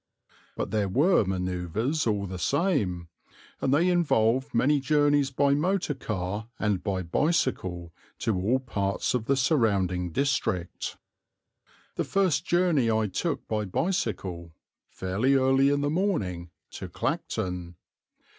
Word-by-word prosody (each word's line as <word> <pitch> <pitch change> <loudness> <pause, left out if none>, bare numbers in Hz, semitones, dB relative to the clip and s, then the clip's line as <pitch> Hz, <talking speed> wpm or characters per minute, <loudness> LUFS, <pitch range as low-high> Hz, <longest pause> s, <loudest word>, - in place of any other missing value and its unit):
But - - -3
there 105 -3 0
were 145 - +4
manoeuvres 95 - -1
all 105 -2 0
the 95 -1 -6
same, 95 - 0 0.5
and 130 - +1
they 155 +6 +3
involved 135 -7 +2
many 140 +5 +3
journeys 145 0 +2
by 140 +1 +2
motor 175 +2 0
car 105 -4 -4
and 105 -4 0
by 95 -3 -1
bicycle 90 - -1 0.2
to 110 - 0
all 100 +8 +1
parts 100 -6 -2
of 120 -3 -1
the 140 - +2
surrounding 100 - +1
district. 110 - -1 1.0
The - - +1
first 190 -6 +1
journey 175 -9 +2
I 110 -2 +1
took 150 - -2
by 105 -1 -1
bicycle, 95 - -2 0.3
fairly 100 +9 0
early 135 +1 +4
in 145 0 +1
the 145 0 0
morning, 105 - -1 0.2
to 95 - -7
Clacton. 95 - -3
115 Hz, 125 wpm, -27 LUFS, 95-145 Hz, 1.0 s, were